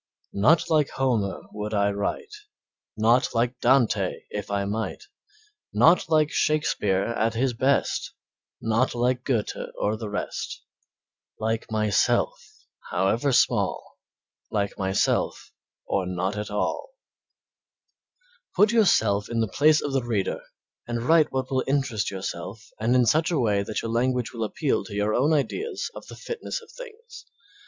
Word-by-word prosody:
Not 125 Hz, +12 st, +4 dB
like 155 Hz, -4 st, +2 dB
Homer 120 Hz, -7 st, -1 dB
would 105 Hz, +1 st, -4 dB
I 100 Hz, 0 st, +2 dB
write, 100 Hz, -, -3 dB, 0.6 s
Not 115 Hz, +3 st, +3 dB
like 120 Hz, +2 st, 0 dB
Dante 115 Hz, -7 st, +2 dB
if 105 Hz, -1 st, -5 dB
I 100 Hz, -1 st, -1 dB
might, 110 Hz, +3 st, -3 dB, 0.7 s
Not 165 Hz, 0 st, +4 dB
like 155 Hz, -1 st, +3 dB
Shakespeare 125 Hz, -, +1 dB
at 115 Hz, 0 st, -1 dB
his 125 Hz, +2 st, +1 dB
best, 130 Hz, +4 st, 0 dB, 0.5 s
Not 115 Hz, +3 st, +1 dB
like 125 Hz, +1 st, 0 dB
Goethe 120 Hz, -6 st, -1 dB, 0.2 s
or 105 Hz, +1 st, 0 dB
the 110 Hz, -2 st, -6 dB
rest, 105 Hz, -, -5 dB, 0.8 s
Like 110 Hz, +1 st, -2 dB
myself, 110 Hz, -, +2 dB, 0.6 s
however 100 Hz, +9 st, +1 dB
small, -, -, +1 dB, 0.5 s
Like 100 Hz, -1 st, -1 dB
myself, 95 Hz, 0 st, 0 dB, 0.3 s
or 95 Hz, -2 st, -1 dB
not 90 Hz, +2 st, -2 dB
at 105 Hz, 0 st, -4 dB
all. 105 Hz, -, -3 dB, 1.6 s
Put 210 Hz, +4 st, +5 dB
yourself 110 Hz, -, +3 dB
in 115 Hz, -1 st, 0 dB
place 150 Hz, +7 st, +4 dB
of 145 Hz, -, -3 dB
the 135 Hz, -, +2 dB
reader 110 Hz, -5 st, -1 dB, 0.5 s
and 120 Hz, -1 st, -3 dB
write 160 Hz, +3 st, +4 dB
what 130 Hz, 0 st, -3 dB
will 130 Hz, -1 st, +1 dB
interest 135 Hz, -6 st, 0 dB
yourself 95 Hz, +2 st, -6 dB
and 115 Hz, +3 st, +2 dB
in 125 Hz, -1 st, +4 dB
such 155 Hz, +8 st, +3 dB
a 170 Hz, -, 0 dB
way 105 Hz, -5 st, +2 dB
that 105 Hz, +2 st, -4 dB
your 115 Hz, -, -3 dB
language 125 Hz, 0 st, 0 dB
will 115 Hz, -2 st, -3 dB
appeal 140 Hz, +6 st, -1 dB
to 105 Hz, -, -8 dB
your 105 Hz, +1 st, 0 dB
own 140 Hz, +7 st, +2 dB
ideas 380 Hz, -, -1 dB
of -, -, -10 dB
the -, -, -10 dB
fitness 470 Hz, +1 st, -5 dB
of 455 Hz, -, -17 dB
things. 475 Hz, -1 st, -12 dB
115 Hz, 145 wpm, -25 LUFS, 105-140 Hz, 1.6 s, Put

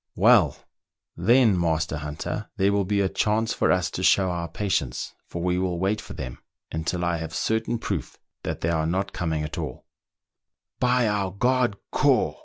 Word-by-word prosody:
" 80 Hz, -, -59 dB, 0.2 s
Well! 95 Hz, -, +5 dB, 0.6 s
then, 110 Hz, +1 st, +4 dB
master 80 Hz, -2 st, 0 dB
hunter, 75 Hz, +8 st, -5 dB
there 100 Hz, +1 st, +3 dB
will 100 Hz, -1 st, +1 dB
be 100 Hz, +1 st, +1 dB
a 95 Hz, -, +2 dB
chance 110 Hz, +4 st, +1 dB
for -, -, +2 dB
us 90 Hz, -2 st, +1 dB
to -, -, -4 dB
show 95 Hz, 0 st, +4 dB
our 85 Hz, -1 st, -3 dB
patience, 90 Hz, -9 st, -2 dB
for 85 Hz, -, -5 dB
we 90 Hz, 0 st, +1 dB
will 90 Hz, -2 st, -1 dB
wait 95 Hz, +4 st, 0 dB
for -, -, -9 dB
them 60 Hz, -3 st, -6 dB, 0.3 s
until 80 Hz, +3 st, -2 dB
I 85 Hz, -1 st, +1 dB
have 80 Hz, 0 st, -6 dB
certain 110 Hz, +6 st, 0 dB
proof 95 Hz, -, -4 dB, 0.2 s
that -, -, -4 dB
they 80 Hz, -, 0 dB
are 80 Hz, -1 st, 0 dB
not 95 Hz, +3 st, -1 dB
coming 80 Hz, -3 st, -1 dB
at 75 Hz, -, -5 dB
all" -, -, -6 dB, 0.5 s
" -, -, -63 dB
By 125 Hz, -1 st, +3 dB
our 105 Hz, -2 st, 0 dB
god 120 Hz, +2 st, +1 dB
Ko! -, -, +2 dB
95 Hz, 190 wpm, -25 LUFS, 80-105 Hz, 0.6 s, Well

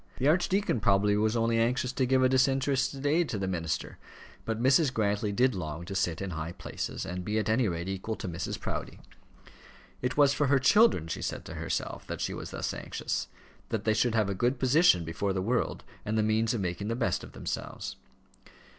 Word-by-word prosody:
The 135 Hz, -, +1 dB
archdeacon 185 Hz, -, +2 dB
probably 100 Hz, +1 st, +3 dB
was 110 Hz, +2 st, +1 dB
only 115 Hz, 0 st, +2 dB
anxious 125 Hz, +2 st, +1 dB
to 130 Hz, 0 st, 0 dB
give 130 Hz, 0 st, +3 dB
a -, -, +6 dB
disinterested 135 Hz, +1 st, +1 dB
aid 160 Hz, +3 st, +2 dB
to 110 Hz, -, -2 dB
the 95 Hz, -1 st, -2 dB
minister, 85 Hz, -4 st, -3 dB, 0.5 s
but 115 Hz, 0 st, -2 dB
Mrs. 130 Hz, +3 st, +4 dB
Grantly 105 Hz, -2 st, 0 dB
did 125 Hz, +5 st, +3 dB
long 80 Hz, -3 st, -5 dB
to 95 Hz, -, -6 dB
sit 90 Hz, -2 st, -1 dB
in 95 Hz, -, -4 dB
high 80 Hz, +1 st, -4 dB
places, -, -, -5 dB
and 90 Hz, +1 st, -4 dB
be 105 Hz, +3 st, -1 dB
at 105 Hz, -2 st, 0 dB
any 110 Hz, +2 st, +2 dB
rate 85 Hz, -1 st, -3 dB
equal 95 Hz, +3 st, -3 dB
to -, -, -6 dB
Mrs. 85 Hz, -1 st, -4 dB
Proudie. -, -, -5 dB, 1.0 s
It 125 Hz, +3 st, -2 dB
was 140 Hz, -1 st, +5 dB
for 145 Hz, 0 st, +1 dB
her 140 Hz, +1 st, +4 dB
children, 135 Hz, -, +4 dB
she 80 Hz, -, -4 dB
said -, -, -4 dB
to -, -, -7 dB
herself, -, -, -4 dB
that -, -, -5 dB
she -, -, -2 dB
was -, -, -6 dB
thus -, -, -3 dB
anxious, -, -, -3 dB, 0.4 s
that -, -, -2 dB
they 110 Hz, -, +2 dB
should 115 Hz, +2 st, +1 dB
have 110 Hz, -3 st, +2 dB
a 100 Hz, -, -1 dB
good 120 Hz, +7 st, +1 dB
position 130 Hz, -, +4 dB
before 95 Hz, +5 st, -2 dB
the 95 Hz, -, -1 dB
world, 120 Hz, +4 st, -1 dB, 0.2 s
and 110 Hz, +1 st, -1 dB
the 110 Hz, -, +3 dB
means 110 Hz, +2 st, +1 dB
of 110 Hz, -, -2 dB
making 90 Hz, +2 st, -3 dB
the 115 Hz, -, -1 dB
best 120 Hz, -1 st, 0 dB
of -, -, -11 dB
themselves. -, -, -5 dB
110 Hz, 210 wpm, -29 LUFS, 95-130 Hz, 1.0 s, a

